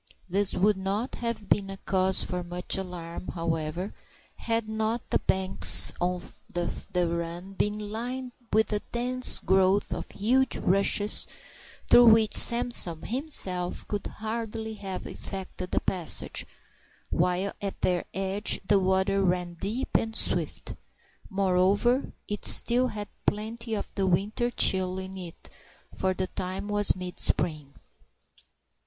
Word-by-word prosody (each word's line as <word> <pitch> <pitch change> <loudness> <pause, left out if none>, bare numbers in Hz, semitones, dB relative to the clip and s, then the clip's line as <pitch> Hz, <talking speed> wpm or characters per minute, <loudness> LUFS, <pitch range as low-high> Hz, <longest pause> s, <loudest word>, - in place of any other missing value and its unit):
This 195 +2 +1
would 200 +2 +2
not 195 +6 -3
have 230 -3 -4
been 195 0 0
a 195 - -7
cause 190 0 +1
for 180 -1 -4
much 175 +1 -2
alarm, 180 -2 -7
however, 165 +2 -3 0.4
had 230 -1 -2
not 220 +2 -2
the - - +2
banks 190 0 +4
of 180 0 -4 0.2
the 175 0 -2
run 170 +3 -5
been 210 +2 -1
lined 240 +5 -5 0.2
with 220 0 +2
a 210 - 0
dense 250 +1 +3
growth 190 +1 +1
of - - -6
huge 255 +6 0
rushes 200 +2 +1 0.6
through 240 0 +8
which 220 -1 +5
Samson 235 -9 +6
himself 195 - -1
could 205 -1 -4
hardly 220 0 -5
have 195 -3 -7
effected 185 -1 -8
a - - +3
passage, 175 -5 -1 0.6
while 180 +3 0
at 200 -1 -5
their 180 -1 0
edge 195 +2 -1
the 205 -1 +4
water 190 +1 +1
ran 180 -1 -1
deep 210 +9 -4
and 225 0 0
swift. - - -2 0.6
Moreover, 200 +6 +1 0.2
it 205 -1 -4
still 245 +2 +5
had 210 -3 -6 0.2
plenty 225 +2 -3
of 205 - -4
the 195 -1 -1
winter 205 +6 0
chill 185 -5 +6
in 190 0 -7
it, 180 -3 -9 0.5
for 190 0 -1
the 185 - -1
time 185 +2 -5
was 205 0 +2
mid 180 -1 -7
spring. 150 -4 0
195 Hz, 135 wpm, -27 LUFS, 180-220 Hz, 0.6 s, through